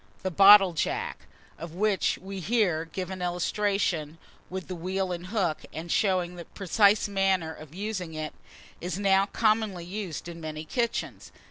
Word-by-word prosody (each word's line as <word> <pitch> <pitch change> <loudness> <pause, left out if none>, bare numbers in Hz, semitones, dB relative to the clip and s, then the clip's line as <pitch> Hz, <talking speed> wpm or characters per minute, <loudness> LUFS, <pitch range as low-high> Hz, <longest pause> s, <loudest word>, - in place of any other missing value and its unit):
THE 190 - -1
BOTTLE 195 0 +8
JACK, 435 - -3 0.3
of 170 0 -8
which 205 0 +1
we 195 +1 -7
here 185 -5 +1
give 185 +3 -5
an 185 -1 -6
illustration, 180 -3 -1 0.3
with 185 0 -5
the 185 - -5
wheel 185 +2 -2
and 175 0 -5
hook, 185 -6 0
and 165 +2 -6
showing 180 -3 +1
the 170 - -8
precise 200 +2 +2
manner 190 -5 +1
of 155 0 -13
using 190 -5 -4
it, 155 0 -4 0.5
is 180 0 -3
now 195 -1 +3
commonly 215 -5 +1
used 185 -4 -5
in 170 -1 -8
many 155 0 -6
kitchens. 235 +7 -3
185 Hz, 155 wpm, -27 LUFS, 170-200 Hz, 0.5 s, BOTTLE